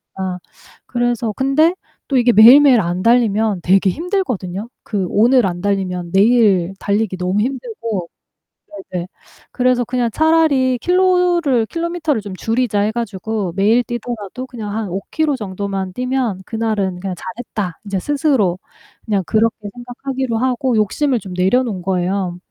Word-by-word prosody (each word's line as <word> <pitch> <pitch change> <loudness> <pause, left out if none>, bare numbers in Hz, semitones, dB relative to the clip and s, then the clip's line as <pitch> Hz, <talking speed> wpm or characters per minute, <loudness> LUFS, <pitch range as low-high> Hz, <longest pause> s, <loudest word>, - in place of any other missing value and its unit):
까. 185 -1 -4 0.5
그래서 240 -2 -1
근데 275 - +2 0.4
또 275 - +2
이게 240 -1 +4
매일매일 245 +3 +8
안 175 +1 -2
달리면 220 -4 +2
되게 190 +1 +3
힘들거든요. 250 - -3 0.2
그 200 -4 -2
오늘 240 +3 +4
안 175 -1 -4
달리면 185 -3 -2
내일 195 -4 +3
달리기 205 -1 -1
너무 180 +2 -1
힘들고 230 -6 -4 0.8
네네. 180 -1 -3 0.5
그래서 250 -1 +1
그냥 245 -1 -1
'차라리 305 -5 +3
킬로를 355 -8 +2
킬로미터를 335 -3 -2
좀 200 -2 -7
줄이자.' 225 0 0
해 210 - +1
가지고 215 -3 -3
매일 215 +5 +3
뛰더라도 240 0 -6
그냥 220 -5 -6
한 220 -2 -3
5 190 +3 -3
키로 310 -3 +1
정도만 195 -3 -4
뛰면 250 -6 -2
그날은 215 -5 -2
그냥 190 0 -4
'잘했다.' 215 -5 -6
인제 200 -2 -3
스스로 270 - +1 0.5
그냥 205 -3 0
그렇게 220 -1 0
생각하기로 245 0 -4
하고 255 0 0
욕심을 240 +5 +1
좀 190 -2 -8
내려 190 +8 +2
놓은 200 -7 -4
거예요. 185 0 -1
225 Hz, 315 characters per minute, -18 LUFS, 195-255 Hz, 0.8 s, 매일매일